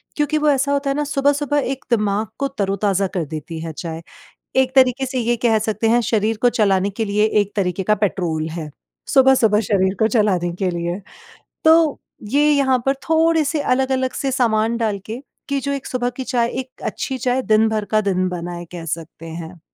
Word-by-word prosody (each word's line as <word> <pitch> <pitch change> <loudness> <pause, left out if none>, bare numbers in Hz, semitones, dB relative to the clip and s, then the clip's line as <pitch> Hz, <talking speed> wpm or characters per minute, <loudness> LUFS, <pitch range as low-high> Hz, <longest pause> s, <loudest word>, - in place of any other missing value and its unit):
क्योंकि 295 +1 +1
वो 300 0 +2
ऐसा 280 0 +2
होता 280 0 0
है 275 - 0
न - - +1
सुबह-सुबह 285 0 +1
एक 270 - -6
दिमाग 210 -2 +1
को 275 - +1
तरो-ताजा 200 -5 0
कर 180 -3 -3
देती 155 +2 -7
है 165 -1 -5
चाय। 165 0 -6 0.6
एक 260 0 +2
तरीके 260 0 +4
से 260 0 -3
ये 240 0 +1
कह 225 -2 +4
सकते 220 +1 -1
हैं 235 +2 +4
शरीर 220 0 0
को 245 - +6
चलाने 200 -3 +2
के 220 +3 -3
लिए 210 +1 +1 0.2
एक 205 0 -2
तरीके 185 -1 0
का 210 +3 +2
पेट्रोल 175 -6 -1
है, 160 -2 -6 0.4
सुबह-सुबह 260 -6 +4
शरीर 190 -3 +1
को 220 - +5
चलाने 190 -7 +1
के 185 - +2
लिए। 175 +2 -3 0.6
तो 320 -2 +4 0.3
ये 295 +2 +4
यहाँ 265 -3 +3
पर 270 - +3
थोड़े 325 0 +3
से 300 +1 -1
अलग 265 -1 +1
अलग 260 0 0
से 275 - -2
सामान 230 -2 +1
डाल 215 -4 -1
के, 230 +4 -6 0.3
कि 280 -1 0
जो 280 +1 -2
एक 275 -2 -4
सुबह 245 -1 -1
की 260 - -4
चाय 240 -2 0
एक 260 0 -9
अच्छी 265 -1 -3
चाय 250 +2 0
दिन-भर 220 -1 +2
का 215 - +3
दिन 185 -3 0
बनाए 175 -1 -5
कह 170 -2 -7
सकते 165 +1 -6
हैं। 165 +1 -8
220 Hz, 200 wpm, -20 LUFS, 190-265 Hz, 0.6 s, को